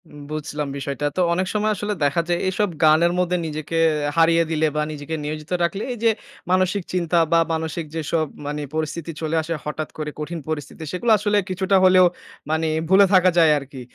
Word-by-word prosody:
উম 150 0 -12
বুঝলাম 150 -1 -4
বিষয়টা। 140 +1 -4
তো - - +3
অনেক 185 +2 -1
সময় 215 0 +1
আসলে 205 +2 -3
দেখা 145 +4 +2
যায় 175 0 +1
এইসব 200 +2 0
গানের 160 +2 +5
মধ্যে 180 0 +1
নিজেকে 155 +1 -4 0.4
হারিয়ে 165 0 +5
দিলে 160 0 +2
বা 150 - +1
নিজেকে 150 +1 -5
নিয়োজিত 150 +2 -6
রাখলে 195 +4 -1
এই - - -8
যে 230 - +5 0.4
মানসিক 185 +1 +2
চিন্তা 175 -1 +1
বা 165 - +5
মানসিক 160 +1 -3
যেসব 160 0 0 0.2
মানি 150 +1 -3
পরিস্থিতি 160 +1 -3
চলে 160 0 -1
আসে 165 +1 -4
হঠাৎ 150 0 -4
করে 150 -1 -4
কঠিন 165 +2 -4
পরিস্থিতি 155 +1 -5
সেগুলো 225 +6 0
আসলে 210 0 +1
কিছুটা 190 +1 +1
হলেও 185 0 +6 0.4
মানি 160 +1 0 0.2
ভুলে 195 +1 +7
থাকা 185 -1 +6
যায় 165 -2 +6
আরকি। 140 -2 -8
165 Hz, 185 wpm, -22 LUFS, 155-185 Hz, 0.4 s, ভুলে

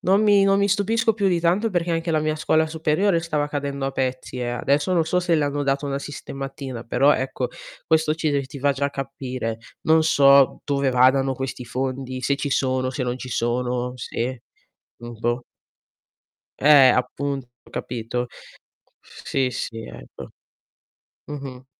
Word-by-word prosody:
non 195 +4 +3
mi 205 -2 +5
non 195 0 +4
mi 200 0 +2
stupisco 215 +3 +2
più 205 -2 0
di 175 -2 +1
tanto 185 +7 +2
perché 175 -2 -1
anche 165 0 -1
la 155 -1 +2
mia 155 0 -1
scuola 160 +1 +2
superiore 160 +3 +1
stava 150 -3 -1
cadendo 140 -1 -3
a - - -1
pezzi 130 -1 -3
eh; 120 -1 -2
adesso 140 +8 0
non 170 -2 +3
so 180 - +1
se 175 -2 +1
le 150 -2 +2
hanno 145 0 -1
dato 140 +1 0
una 140 0 -2
sistematina 135 -3 -7
però 140 +5 +4
ecco 130 -1 -2 0.4
questo 160 -1 +2
ci 155 -1 -1
ti 140 -2 0
ti 140 - -9
fa 140 +1 +2
già 140 +1 -1
capire. 130 -4 -4 0.2
Non 160 0 +4
so 140 -3 +5
dove 140 -2 +1
vadano 130 +1 +4
questi 130 -1 -5
fondi, 130 +1 -4
se 140 +2 +1
ci 145 -1 -3
sono, 130 -1 0
se 130 0 -3
non 125 0 -2
ci 130 - -7
sono, 125 +1 -1
se 120 0 -4 0.6
mhmm, 120 -1 -9
boh. 120 +1 -1 1.2
Eh, 145 -2 +7
appunto 135 +1 -1 0.2
capito? 120 +1 -4 0.7
Sì, 130 -2 -3
sì 115 -2 -5
ecco. - - -11 1.0
Mh-mh. 135 -3 -8
140 Hz, 165 wpm, -23 LUFS, 130-155 Hz, 1.2 s, Eh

